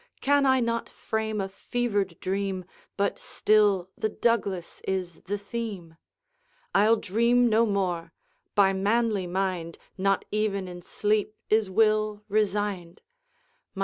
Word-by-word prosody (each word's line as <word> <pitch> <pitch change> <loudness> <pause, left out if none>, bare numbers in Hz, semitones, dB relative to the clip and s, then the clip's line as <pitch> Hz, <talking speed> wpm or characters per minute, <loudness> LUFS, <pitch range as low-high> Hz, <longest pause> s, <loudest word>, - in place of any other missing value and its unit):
Can 285 0 +3
I 260 -1 +4
not 230 0 -1
frame 220 -1 -3
a 195 - -1
fevered 200 -3 -2
dream, 190 -1 -2 0.3
But 200 0 0
still 205 -4 +2
the 215 - -1
Douglas 200 -6 -1
is 185 -3 -3
the 205 +2 -2
theme? 200 -5 -6 0.8
I'll 215 +3 +5
dream 235 +4 +2
no 225 +1 +3
more, 180 -5 -1 0.4
by 195 -1 +5
manly 205 0 +1
mind 180 -2 -2 0.2
Not 195 0 +1
even 205 -3 0
in 175 -1 -8
sleep 210 +3 0 0.2
is 215 -2 +3
will 215 +1 +2
resigned. 205 -4 -1
205 Hz, 120 wpm, -27 LUFS, 190-220 Hz, 0.8 s, I'll